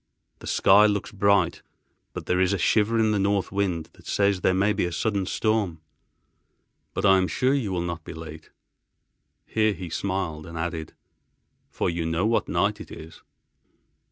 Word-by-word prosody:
The - - -10
sky 105 +2 +5
looks 105 -1 -2
bright 100 -3 +2 0.5
but - - -6
there 90 - +1
is 95 +1 +2
a - - 0
shiver 110 +5 +2
in 110 -1 +3
the 105 - +1
north 100 0 0
wind 95 -5 -2
that - - -18
says 100 -2 +1
there - - +3
may 100 +2 +2
be 100 - 0
a 90 - -3
sudden 100 +1 -1
storm. 105 -6 0 1.2
But - - -1
I 95 -1 +6
am 95 - +1
sure 130 +7 +1
you 125 -8 -1
will 90 -2 -1
not 85 -2 -5
be - - -8
late." 80 -1 -10 1.0
Here 110 -1 +1
he 90 -3 -8
smiled, 90 -5 -3
and 85 0 -8
added, 80 -1 -4 0.8
"for - - -2
you 85 -1 -2
know 80 +4 0
what 115 +1 +1
night - - 0
it - - -10
is." 80 +1 -11
95 Hz, 180 wpm, -25 LUFS, 85-105 Hz, 1.2 s, I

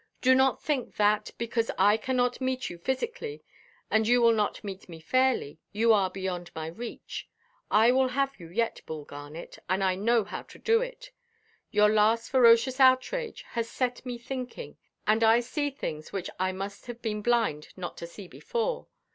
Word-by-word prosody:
Do 260 0 +5
not 265 0 +3
think 280 -5 -2
that, 210 0 +2
because 230 0 -1
I 205 +2 +5
cannot 250 +2 0
meet 260 0 -1
you 175 - -10
physically, 440 - -3 0.5
and 220 0 +3
you 245 +1 +5
will 235 -1 +6
not 210 -2 -1
meet 195 -2 -8
me 165 -1 -9
fairly, 245 - +1
you 225 +2 +4
are 195 -3 +3
beyond 185 -2 -4
my 160 -1 -4
reach. 225 +9 -7 0.4
I 220 +3 +5
will 260 +1 +3
have 275 0 -1
you 170 - -10
yet, 230 +6 -1
Bull 155 -2 -6
Garnet; 145 +3 -9
and 190 +1 +1
I 190 -1 +3
know 225 +4 +2
how 200 - -6
to - - -15
do 455 +1 +2
it. - - -7 0.6
Your 210 0 +4
last 215 +2 +2
ferocious 255 0 +5
outrage 270 - +3
has 230 -1 -3
set 250 -1 -2
me 245 -1 -5
thinking, 255 - -6 0.3
and 220 +2 +3
I 225 +1 +6
see 290 +4 -2
things 155 - -6
which 190 -2 -4
I 185 0 +1
must 195 +4 -7
have 240 -1 -8
been 210 -2 -2
blind 225 -10 +1
not 180 -2 -5
to 170 - -6
see 190 +2 -11
before. 480 - -3
230 Hz, 180 wpm, -28 LUFS, 195-260 Hz, 0.6 s, will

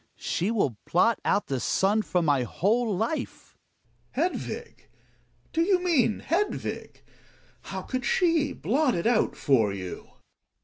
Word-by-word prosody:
She 185 - -1
will 145 - 0
blot 220 +6 +3
out 205 - +1
the 135 -2 -2
sun 200 - +2
from 180 -5 0
my 145 -3 +3
whole 215 - 0
life. 230 - -4 0.6
Gregers. 340 +7 0
Hedvig! - - -8 0.6
Do 325 - +2
you 370 +2 +4
mean 295 -12 +2
Hedvig? 370 +8 -2 0.6
How - - -5
could 255 -1 -3
she 325 -2 +2
blot 270 +1 +1
it 170 - -2
out 230 -2 +2
for 115 -8 +2
you 95 -2 -7
225 Hz, 135 wpm, -27 LUFS, -, 0.6 s, you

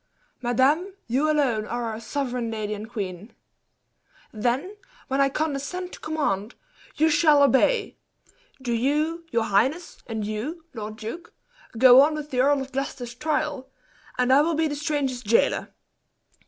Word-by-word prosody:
"Madame, 280 - +2
you 270 +6 +1
alone 255 -8 +1
are 240 0 -3
our 225 -1 -4
sovereign 250 -1 -3
lady 215 -1 -3
and 210 +1 -7
queen!" 200 -2 -6 1.0
"Then, 250 - -1 0.3
when 270 +1 +1
I 275 - +4
condescend 310 +5 -3
to - - -9
command, 240 -9 -2 0.4
you 315 - +3
shall 300 -2 +5
obey! 280 - +2 0.6
Do 245 -3 -2
you, 305 +7 0
your 230 -1 +1
highness, 250 - 0
and 220 -2 -3
you, 265 +11 -5
lord 215 -2 -6
duke, 240 +10 -8 0.4
go 255 +2 +8
on 305 +2 +3
with 300 -1 -6
the 250 - -1
Earl 280 +1 +3
of 265 - -12
Gloucester's 260 -3 -4
trial, 300 -1 -2 0.5
and 250 +1 +3
I 280 - +7
will 325 +2 +1
be 320 +1 +1
the 295 - -3
stranger's 285 -4 -2
jailer." 230 0 +1
265 Hz, 150 wpm, -25 LUFS, 230-300 Hz, 1.0 s, go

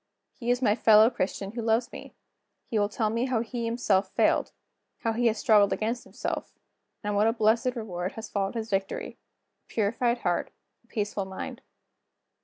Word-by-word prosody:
He 240 -3 -5
is 245 +1 +2
my 210 - +4
fellow 220 0 +6
Christian 195 -1 -3
who 235 +1 -4
loves 230 +3 +1
me. - - -10 0.6
He 220 - +2
will 205 0 +2
tell 215 0 0
me 230 +2 0
how 250 -4 0
he 240 +1 -5
has 235 - -1
himself 205 -5 +1
failed; - - +2 0.5
how 225 - 0
he 240 +1 +2
has 220 -1 +1
struggled 210 -2 +4
against 230 +3 -2
himself; - - -5 0.5
and 205 0 -1
what 210 +2 +4
a 225 - +3
blessed 230 +3 +2
reward 185 -5 -4
has 225 0 -7
followed 195 +2 -2
his 225 -1 -4
victory 195 0 -2 0.4
a - - -51
purified 235 +3 +1
heart, 175 -1 0 0.3
a - - -31
peaceful 205 -3 -2
mind." 190 0 -7
220 Hz, 185 wpm, -27 LUFS, 205-235 Hz, 0.6 s, fellow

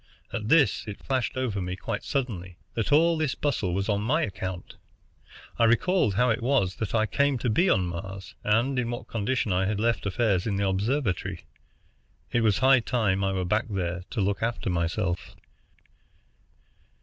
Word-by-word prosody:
At 110 -2 -3
this 155 -7 +4
it 105 - -6
flashed 130 -1 -1
over 115 -7 -1
me 90 0 -3
quite 105 +2 -4
suddenly 95 -11 -3 0.2
that 115 +4 -2
all 165 +3 +5
this 150 -5 0
bustle 110 -11 -1
was 100 0 -1
on 105 -2 +1
my 150 +10 +1
account. 95 -3 -5 0.8
I 115 - +5
recalled 120 - +2
how 125 +3 +3
it 110 - -1
was 120 -7 +1
that 110 -1 -3
I 110 -1 +3
came 140 +6 +1
to 120 -1 -1
be 175 - +3
on 95 - +3
Mars, 95 +2 -6
and 120 +5 +2
in 120 -2 -1
what 120 +1 -5
condition 115 -1 -1
I 95 +1 +1
had 105 0 -1
left 115 -1 0
affairs 100 -2 +1
in 105 - 0
the 100 0 +1
observatory. 100 - -1 0.9
It 120 - +2
was 105 -4 +3
high 130 0 +5
time 110 -5 0
I 95 - +1
were 95 -1 -1
back 105 +6 0
there 90 -3 -2
to 105 - -2
look 100 +1 0
after 115 -4 -1
myself. 85 +2 -2
110 Hz, 180 wpm, -27 LUFS, 95-125 Hz, 0.9 s, all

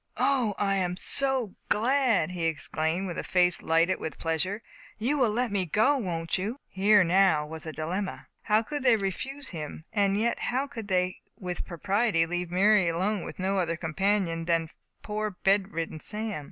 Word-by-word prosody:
"O, 250 -7 +2
I 195 -1 +1
am 180 -1 -1
so 265 -3 0 0.2
glad!" 230 - +2
he 175 -2 -3
exclaimed, 160 +2 -1
with 175 -3 -4
a - - -3
face 180 -1 +3
lighted 165 +3 +2
with 160 - -5
pleasure; 180 +7 -2 0.3
"you 245 +7 +1
will 245 -4 +4
let 235 +2 0
me 200 -2 +1
go, 220 - +3
won't 175 -6 -2
you?" 215 +7 -3
Here 200 +1 +4
now 175 -3 +3
was 160 +1 -8
a - - -3
dilemma. 180 +6 -4 0.2
How 215 +1 +2
could 290 +5 -4
they 250 -3 +5
refuse 265 +8 -4
him? 155 -2 -7
and 200 -2 +2
yet 235 +2 0
how 260 +3 -1
could 230 -7 -7
they 185 -1 0 0.2
with 180 -1 -4
propriety 195 +1 +1
leave 175 +1 -3
Mary 190 0 +4
with 190 +3 -2
no 190 +1 0
other 170 -2 -1
companion 170 0 0
than 165 -1 0 0.3
poor 215 0 -2
bed 195 +1 +1
ridden 165 -2 -4
Sam? 215 +1 -4
195 Hz, 175 wpm, -28 LUFS, 170-215 Hz, 0.3 s, they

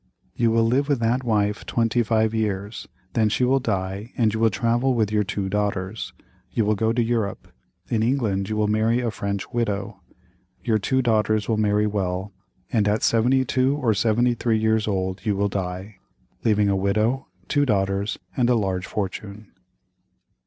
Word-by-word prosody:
You 115 -1 +2
will 115 0 +3
live 130 +6 +1
with 140 - +3
that 120 +3 +1
wife 105 -3 0
twenty 115 0 +1
five 110 -1 +1
years, 105 -1 -2 0.3
then 110 -2 +2
she 125 - 0
will 130 +2 +3
die 100 0 -3
and 110 -3 +2
you 110 - -2
will 115 0 +4
travel 120 +5 +1
with 110 -3 +1
your 105 -1 +2
two 100 0 -3
daughters. 100 0 -2 0.4
You 110 - +1
will 105 - +3
go 110 +2 +1
to 120 +1 +1
Europe. 115 -4 -2 0.4
In 110 - 0
England 110 -6 0
you 110 - -1
will 105 -1 +2
marry 110 +3 +2
a 120 -2 -1
French 100 -2 -4
widow. 105 -4 -2 0.6
Your 110 -3 +2
two 130 +5 +1
daughters 110 -2 +1
will 110 - +1
marry 105 0 +2
well, 95 -1 -2 0.4
and 105 -3 +3
at 105 +1 +1
72 130 +3 +2
or 120 -7 +2
73 115 +3 +1
years 110 0 +1
old 95 -1 -2
you 105 -2 0
will 100 +1 +1
die, 95 +1 -5 0.5
leaving 105 -2 +3
a 100 - +2
widow, 110 +7 0 0.2
two 145 -1 +2
daughters, 100 -1 0 0.2
and 125 -2 +2
a 125 - +4
large 95 -4 -1
fortune." 100 +1 -5
110 Hz, 175 wpm, -23 LUFS, 100-115 Hz, 0.6 s, will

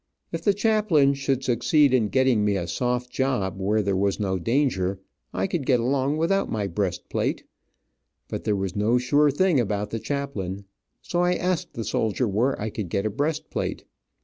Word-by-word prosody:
If 165 - -3
the 205 - +3
chaplain 205 -10 +3
should 135 -1 -1
succeed 130 +3 +3
in 120 -5 +3
getting 130 -4 +3
me 105 -1 +2
a 90 -3 -2
soft 125 +5 -2
job, 105 -9 -1
where 105 +2 +1
there 100 -1 0
was 100 +2 0
no 95 -2 -1
danger, 100 - 0 0.3
I - - -1
could 175 -6 -2
get 125 -2 +3
along 135 +4 0
without 185 +5 +1
my 105 -3 -1
breast 95 -1 -2
plate, - - -1 0.8
but - - -5
there 105 -2 +1
was 95 -1 -3
no 110 +4 +2
sure 145 +4 +3
thing 165 +1 +2
about 105 -2 -1
the 115 - -2
chaplain, 105 -9 -4 0.4
so 175 - -1
I 180 0 +2
asked 180 -1 -1
the 115 - -3
soldier 110 +3 0
where 115 +7 0
I 110 +1 -3
could 100 -5 -5
get 100 +4 -1
a 110 - 0
breastplate. 150 +7 -3
125 Hz, 185 wpm, -25 LUFS, 100-145 Hz, 0.8 s, the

